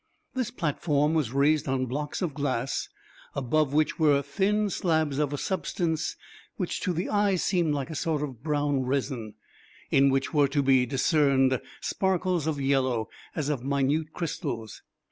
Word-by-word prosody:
This 255 -3 -1
platform 150 - 0
was 150 -8 +1
raised 145 +3 +2
on 130 -1 0
blocks 145 +8 -3
of 165 -5 -1
glass, 135 -3 -2 0.5
above 140 +2 +1
which 155 +3 +1
were 145 -3 +4
thin 200 +9 +1
slabs 160 -6 +1
of 150 -2 +1
a 145 - -2
substance 160 -2 -1 0.4
which 180 - -2
to 185 - 0
the 175 +2 -2
eye 205 -2 +2
seemed 175 -4 +1
like 140 +2 -3
a - - -5
sort 150 0 -1
of 130 -6 -6
brown 145 -2 0
resin, 125 -4 -2 0.6
in 140 0 +5
which 135 +3 0
were 145 -2 +4
to 140 +1 0
be 130 -2 +4
discerned 135 -1 +3 0.2
sparkles 185 -4 0
of 155 -3 -1
yellow, 130 -5 +1 0.3
as 150 -3 -1
of 140 -5 -2
minute 140 +3 0
crystals. 120 - -4
145 Hz, 160 wpm, -27 LUFS, 135-160 Hz, 0.6 s, in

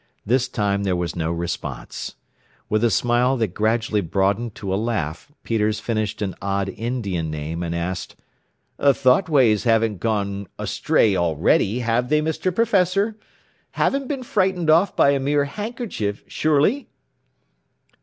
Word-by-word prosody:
This 125 +3 +2
time 100 -5 -1
there 95 -2 0
was 90 -1 -3
no 80 -1 -1
response. 85 0 -5 0.5
With 110 +1 +1
a 120 - +4
smile 120 +5 +2
that 110 -4 0
gradually 110 0 +1
broadened 100 +6 0
to 95 -2 -4
a - - +2
laugh 105 - -3
Peters 110 -1 0
finished 110 -2 -2
an 95 -2 -2
odd 100 +1 -1
Indian 100 -9 -3
name, 75 +2 -4
and 85 -1 -3
asked, 85 +2 -4 0.6
"The 140 -2 +4
thought 130 +8 +3
waves 125 -9 +4
haven't 115 -4 +2
gone 100 -2 -2
astray 105 -3 +1
already, 85 +7 +2
have 120 +1 0
they, 150 +1 +3
Mr. 160 +4 -1
Professor? 200 -1 +2 0.6
Haven't 275 -1 0
been 275 -2 -3
frightened 185 -7 +1
off 170 +5 +3
by 140 - +5
a 140 - +1
mere 140 +1 +1
handkerchief, 205 - -4
surely?" 155 - +1
115 Hz, 145 wpm, -22 LUFS, 100-145 Hz, 0.6 s, by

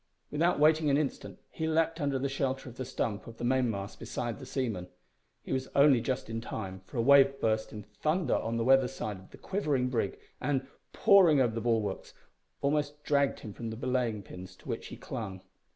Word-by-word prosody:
Without 165 +4 +2
waiting 155 0 +4
an 140 - +4
instant 150 -2 -3
he 160 - -3
leaped 165 +1 +1
under 140 -2 +1
the 135 +1 -1
shelter 135 -1 -2
of 125 0 -10
the 130 - -4
stump 110 -4 -3
of 115 -1 -10
the - - -7
mainmast 120 -6 0
beside 120 +1 -4
the 130 - -9
seaman. 115 -10 -2 0.6
He - - -4
was 130 0 -1
only 140 -4 +6
just 130 +1 -2
in 115 0 -4
time, 95 -5 -6
for - - -8
a 115 - +2
wave 135 +1 +6
burst 110 -1 0
in 105 -1 -7
thunder 155 - -1
on 115 +1 -1
the 115 - 0
weather 135 +1 +5
side 110 -6 -5
of 95 - -16
the - - -13
quivering 145 -10 0
brig, 115 -6 -1 0.2
and, 135 0 0 0.3
pouring 180 -7 +6
over 120 -4 +2
the 115 - -3
bulwarks, 110 -4 -1 0.5
almost 145 +1 0
dragged 140 -1 +1
him 105 - -8
from 115 +1 -5
the 110 - -6
belaying 120 -4 -1
pins 90 +1 -10
to - - -18
which - - -4
he - - -9
clung. 95 -4 -6
130 Hz, 205 wpm, -30 LUFS, 110-140 Hz, 0.6 s, only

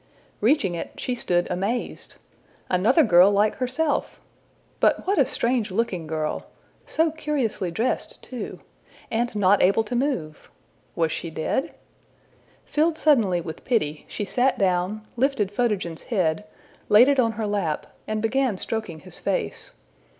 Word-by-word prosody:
Reaching 220 - +2
it, 170 - -6
she 250 - -2
stood 175 -7 0
amazed. 200 +7 -3 0.6
Another 220 - +4
girl 180 -4 +6
like 205 +1 +2
herself! 265 +4 -1 0.6
But - - +2
what 390 -1 +1
a 270 - +4
strange 235 -2 0
looking 185 -5 -2
girl! 155 -1 -3 0.4
so 320 0 +1
curiously 280 - -2
dressed 220 +9 -2
too! 250 -2 -7 0.5
and 235 0 -1
not 205 0 +4
able 195 +5 +4
to 220 +3 -4
move! 240 - -2 0.5
Was 165 -2 +1
she 170 - -4
dead? 160 - -2 0.9
Filled 315 +2 +1
suddenly 225 - +3
with 160 -1 -8
pity, 155 - -1
she 205 - -4
sat 255 +5 +1
down, 190 +3 0
lifted 235 -6 +1
Photogen's 205 -7 -1
head, 185 -4 -1 0.4
laid 220 +5 +7
it 280 -1 +3
on 230 -3 +3
her 220 0 -3
lap, 200 -7 -1 0.2
and 215 0 -2
began 245 -2 +1
stroking 185 -7 -4
his - - -11
face. - - -2
215 Hz, 140 wpm, -24 LUFS, 180-255 Hz, 0.9 s, laid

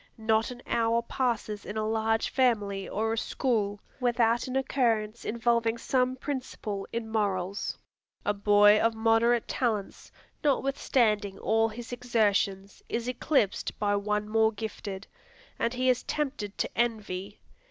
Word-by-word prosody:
Not 220 +1 +1
an 245 0 -9
hour 230 0 +1
passes 230 -4 -2
in 205 - -6
a 215 0 0
large 225 0 0
family 205 -7 +1
or 220 +2 -1
a - - -3
school, 210 -7 -1 0.2
without 240 -1 +2
an 255 - -4
occurrence 235 -5 0
involving 235 0 +1
some 255 +1 +1
principle 250 -7 -4
in 230 -1 -3
morals. 200 -3 -1 0.5
A 205 - +2
boy 205 +1 +5
of 230 0 +2
moderate 225 +1 +3
talents, 220 -6 -2 0.3
notwithstanding 240 -8 +1
all 225 +2 +2
his 235 +2 -8
exertions, 205 -5 0
is 235 +1 -2
eclipsed 250 -4 0
by 205 -1 +1
one 210 +1 -1
more 220 0 +3
gifted, 205 -2 -6 0.5
and 230 - +1
he 255 +1 -1
is 255 -1 +3
tempted 265 -9 -3
to - - -1
envy. 210 -4 -2
225 Hz, 135 wpm, -28 LUFS, 205-240 Hz, 0.5 s, boy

